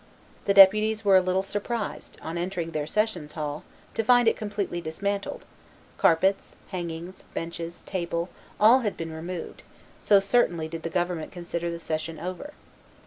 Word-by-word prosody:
The 200 Hz, -, +2 dB
deputies 215 Hz, +2 st, +7 dB
were 195 Hz, -1 st, +6 dB
a -, -, +5 dB
little 185 Hz, +1 st, +1 dB
surprised, 205 Hz, +2 st, -4 dB
on 160 Hz, -, -5 dB
entering 175 Hz, -1 st, -3 dB
their 150 Hz, -2 st, -2 dB
sessions 210 Hz, -8 st, -1 dB
hall, 150 Hz, -2 st, -4 dB, 0.3 s
to 225 Hz, -, 0 dB
find 245 Hz, +1 st, +5 dB
it -, -, +5 dB
completely 205 Hz, -4 st, -3 dB
dismantled: 200 Hz, +5 st, -3 dB, 0.5 s
carpets, 190 Hz, +4 st, +3 dB
hangings, 175 Hz, 0 st, -6 dB
benches, 170 Hz, 0 st, -5 dB
table, 170 Hz, -2 st, -3 dB, 0.3 s
all 225 Hz, +5 st, +7 dB
had 215 Hz, -5 st, -2 dB
been 165 Hz, -1 st, -5 dB
removed, 170 Hz, +2 st, -6 dB, 0.4 s
so 200 Hz, -1 st, +5 dB
certainly 195 Hz, -6 st, +2 dB
did 165 Hz, 0 st, -6 dB
the 165 Hz, -, -3 dB
government 175 Hz, -2 st, -2 dB
consider 170 Hz, -1 st, -4 dB
the 170 Hz, 0 st, -5 dB
session 160 Hz, -1 st, -4 dB
over. 185 Hz, -, -6 dB
180 Hz, 150 wpm, -26 LUFS, 165-205 Hz, 0.5 s, deputies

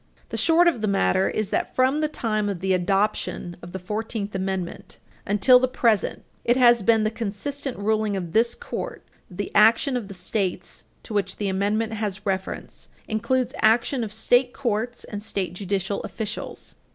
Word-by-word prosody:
The -, -, -4 dB
short 340 Hz, +1 st, +4 dB
of 295 Hz, -10 st, +2 dB
the 215 Hz, -, 0 dB
matter 195 Hz, -1 st, +2 dB
is 215 Hz, -2 st, -2 dB
that, -, -, -1 dB
from 260 Hz, +4 st, +3 dB
the 305 Hz, -, +2 dB
time 215 Hz, -8 st, -1 dB
of 195 Hz, -3 st, -3 dB
the 190 Hz, +1 st, +1 dB
adoption 190 Hz, -1 st, 0 dB
of 170 Hz, -, -10 dB
the 190 Hz, -, -4 dB
Fourteenth 210 Hz, +2 st, -4 dB
Amendment 190 Hz, -2 st, -4 dB, 0.3 s
until 210 Hz, +5 st, +6 dB
the 255 Hz, -, +2 dB
present, 230 Hz, -5 st, +1 dB, 0.2 s
it 240 Hz, +2 st, +3 dB
has 240 Hz, -2 st, +6 dB
been 225 Hz, +1 st, +3 dB
the 215 Hz, -, +1 dB
consistent 245 Hz, +5 st, -4 dB
ruling 215 Hz, 0 st, 0 dB
of 175 Hz, -3 st, -5 dB
this 235 Hz, +2 st, +3 dB
Court -, -, -6 dB, 0.3 s
that 180 Hz, -, -13 dB
the 205 Hz, -, -3 dB
action 225 Hz, +5 st, +5 dB
of 235 Hz, -5 st, -3 dB
the 195 Hz, -, -9 dB
States 180 Hz, -1 st, -3 dB, 0.2 s
to -, -, -8 dB
which 205 Hz, -1 st, -1 dB
the 205 Hz, -2 st, -1 dB
Amendment 210 Hz, +4 st, 0 dB
has 210 Hz, -2 st, -4 dB
reference 190 Hz, -1 st, -4 dB, 0.2 s
includes 250 Hz, +3 st, 0 dB
action 235 Hz, +3 st, +3 dB
of 215 Hz, -, -5 dB
state 245 Hz, +3 st, +2 dB
courts 240 Hz, -2 st, -2 dB
and 205 Hz, -2 st, -6 dB
state 195 Hz, -5 st, -3 dB
judicial 195 Hz, +1 st, -2 dB
officials. 220 Hz, -2 st, -6 dB
215 Hz, 175 wpm, -24 LUFS, 195-235 Hz, 0.3 s, until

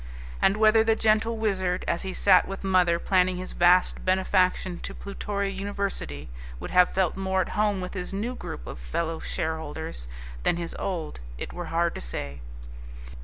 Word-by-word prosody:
And 195 Hz, +2 st, +4 dB
whether 220 Hz, +1 st, +6 dB
the 225 Hz, 0 st, +3 dB
gentle 225 Hz, +1 st, +2 dB
Wizard, 190 Hz, -4 st, 0 dB
as 170 Hz, -, 0 dB
he 190 Hz, -, -4 dB
sat 185 Hz, 0 st, +5 dB
with 195 Hz, 0 st, -6 dB
mother 180 Hz, -3 st, +3 dB
planning 185 Hz, 0 st, +2 dB
his 185 Hz, 0 st, -5 dB
vast 180 Hz, +1 st, +4 dB
benefaction 185 Hz, -1 st, +2 dB
to -, -, -6 dB
Plutoria 200 Hz, 0 st, -3 dB
University, 195 Hz, -, -4 dB, 0.3 s
would -, -, -6 dB
have 180 Hz, 0 st, +6 dB
felt 185 Hz, -3 st, +2 dB
more 190 Hz, 0 st, 0 dB
at -, -, -3 dB
home 210 Hz, -2 st, +1 dB
with 180 Hz, -, -5 dB
his 180 Hz, -2 st, -4 dB
new 215 Hz, +6 st, -2 dB
group -, -, -7 dB
of -, -, -7 dB
fellow 160 Hz, -, -2 dB
shareholders 160 Hz, -, -4 dB, 0.3 s
than 165 Hz, -, +1 dB
his 170 Hz, -1 st, -5 dB
old, 170 Hz, -, -3 dB, 0.2 s
it -, -, -6 dB
were 175 Hz, -, -5 dB
hard 170 Hz, +1 st, +1 dB
to -, -, -6 dB
say. 70 Hz, +2 st, -5 dB
185 Hz, 170 wpm, -26 LUFS, 170-200 Hz, 0.3 s, whether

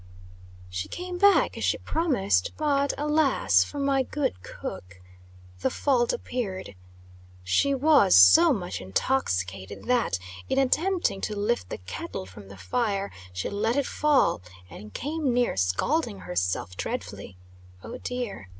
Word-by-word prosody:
She 90 Hz, +1 st, -4 dB
came 360 Hz, 0 st, -6 dB
back, 405 Hz, +1 st, +4 dB
as -, -, -4 dB
she -, -, +1 dB
promised, 220 Hz, -, 0 dB
but, 285 Hz, -2 st, +1 dB
alas 300 Hz, 0 st, +3 dB
for 290 Hz, -, -9 dB
my 275 Hz, -1 st, +2 dB
good 260 Hz, -, -2 dB
cook! 95 Hz, +1 st, -8 dB, 0.6 s
The -, -, +1 dB
fault 250 Hz, -4 st, +1 dB
appeared. 190 Hz, -, -4 dB, 0.7 s
She 275 Hz, -, +2 dB
was 285 Hz, -, +5 dB
so 320 Hz, -, +8 dB
much 180 Hz, -, -3 dB
intoxicated 95 Hz, -, -2 dB
that, 245 Hz, -, +1 dB, 0.3 s
in 265 Hz, -, 0 dB
attempting 315 Hz, -, +1 dB
to 210 Hz, -, -3 dB
lift 210 Hz, +4 st, -1 dB
the -, -, -5 dB
kettle 90 Hz, +1 st, -7 dB
from 95 Hz, +2 st, -13 dB
the 100 Hz, 0 st, -12 dB
fire, 200 Hz, -, -1 dB, 0.2 s
she 90 Hz, 0 st, -4 dB
let 220 Hz, +4 st, -1 dB
it 285 Hz, -1 st, +1 dB
fall, 300 Hz, -, +2 dB, 0.3 s
and 105 Hz, 0 st, -10 dB
came 295 Hz, -, -2 dB
near 245 Hz, 0 st, +1 dB
scalding 195 Hz, -, 0 dB
herself 90 Hz, 0 st, -2 dB
dreadfully. 90 Hz, -, -6 dB, 0.5 s
Oh, -, -, -8 dB
dear! 240 Hz, -, -5 dB
235 Hz, 135 wpm, -26 LUFS, -, 0.7 s, so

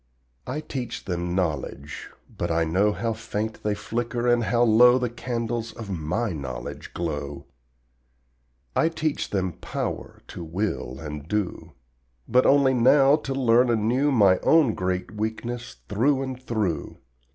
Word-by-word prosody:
I 140 Hz, +5 st, -3 dB
teach 125 Hz, -6 st, -5 dB
them 90 Hz, -1 st, -2 dB
KNOWLEDGE, 75 Hz, -4 st, -3 dB, 0.3 s
but -, -, -2 dB
I 85 Hz, 0 st, +2 dB
know 95 Hz, +6 st, +2 dB
How 115 Hz, +2 st, -2 dB
faint 110 Hz, 0 st, -4 dB
they 105 Hz, -1 st, 0 dB
flicker 120 Hz, +3 st, -2 dB
and 120 Hz, -1 st, +3 dB
how 120 Hz, +1 st, +2 dB
low 120 Hz, +2 st, +7 dB
The 125 Hz, -2 st, -1 dB
candles 115 Hz, -1 st, -3 dB
of 110 Hz, -4 st, -7 dB
my 90 Hz, +6 st, -1 dB
knowledge 65 Hz, -5 st, -6 dB
glow. 75 Hz, -4 st, -4 dB, 1.3 s
I 160 Hz, -, +3 dB
teach 155 Hz, -2 st, -2 dB
them 95 Hz, -2 st, -1 dB
POWER -, -, -4 dB
to 85 Hz, -, -7 dB
will 85 Hz, -, -3 dB
and 75 Hz, -1 st, -7 dB
do, 90 Hz, -5 st, -3 dB, 0.5 s
But 125 Hz, +2 st, +4 dB
only 140 Hz, -1 st, +5 dB
now 135 Hz, +3 st, +6 dB
to 135 Hz, -3 st, -4 dB
learn 125 Hz, -1 st, +4 dB
anew 120 Hz, +6 st, +2 dB
My 100 Hz, -7 st, +5 dB
own 155 Hz, -8 st, +4 dB
great 90 Hz, -1 st, -2 dB
weakness 115 Hz, +3 st, -4 dB
through 130 Hz, +6 st, +2 dB
and 130 Hz, -1 st, -6 dB
through. 105 Hz, -, -2 dB
110 Hz, 140 wpm, -25 LUFS, 90-125 Hz, 1.3 s, low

